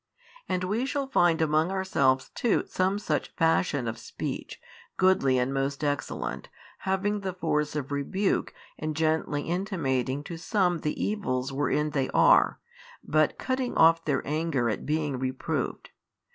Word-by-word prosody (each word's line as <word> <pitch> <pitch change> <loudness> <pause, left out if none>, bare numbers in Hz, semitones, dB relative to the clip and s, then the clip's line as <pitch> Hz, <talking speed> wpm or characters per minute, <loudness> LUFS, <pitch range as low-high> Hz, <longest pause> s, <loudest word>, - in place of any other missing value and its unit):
And 185 0 0
we 220 +8 -1
shall 280 +1 -1
find 175 -10 +3
among 155 +2 +2
ourselves 140 -9 +1
too 235 - +1
some 185 +2 0
such 205 - -2
fashion 160 -6 +2
of 115 - -4
speech, - - -6 0.4
goodly 185 -9 +3
and 125 +2 0
most 135 +1 -2
excellent, 145 -3 -3 0.4
having 205 +2 +1
the 190 -2 -4
force 150 -4 -1
of 145 -1 -3
rebuke 190 +8 0 0.3
and 155 0 -3
gently 155 -2 0
intimating 145 - -1
to 170 +2 -7
some 180 -1 +1
the 150 - -3
evils 135 -11 -1
wherein 150 +2 0
they 135 -3 0
are, - - +5 0.4
but 155 0 +2
cutting 260 -1 -2
off 165 0 +6
their 150 - -1
anger 150 -6 0
at 105 - -5
being 150 -3 -1
reproved. 130 0 -3
155 Hz, 145 wpm, -27 LUFS, 140-185 Hz, 0.4 s, off